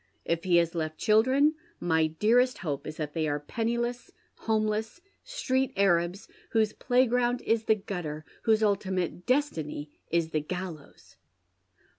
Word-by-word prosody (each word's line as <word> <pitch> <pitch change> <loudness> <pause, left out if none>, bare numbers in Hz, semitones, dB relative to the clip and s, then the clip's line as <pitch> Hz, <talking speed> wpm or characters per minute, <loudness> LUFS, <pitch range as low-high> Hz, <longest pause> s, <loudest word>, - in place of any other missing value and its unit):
If 170 +1 -1
he 180 -2 +3
has 170 -1 +3
left 155 -2 -3
children, 260 +7 +4 0.3
my 160 -2 +2
dearest 230 +10 +2
hope 145 -3 -3
is 155 - -6
that 150 -2 -4
they 160 -1 0
are 145 0 -1
penniless, 235 +8 -2 0.4
homeless, 220 +4 0 0.2
street 265 - -1
Arabs, 180 -1 +2 0.3
whose 220 -2 +2
playgrouud 245 -1 +2
is 225 0 +1
the 220 - +4
gutter, 175 -7 -5 0.2
whose 220 -1 +3
ultimate 190 -4 -1
destiny 160 - -1 0.2
is 165 -1 0
the 155 - 0
gallows." 175 -2 -8
195 Hz, 135 wpm, -28 LUFS, 160-235 Hz, 0.4 s, children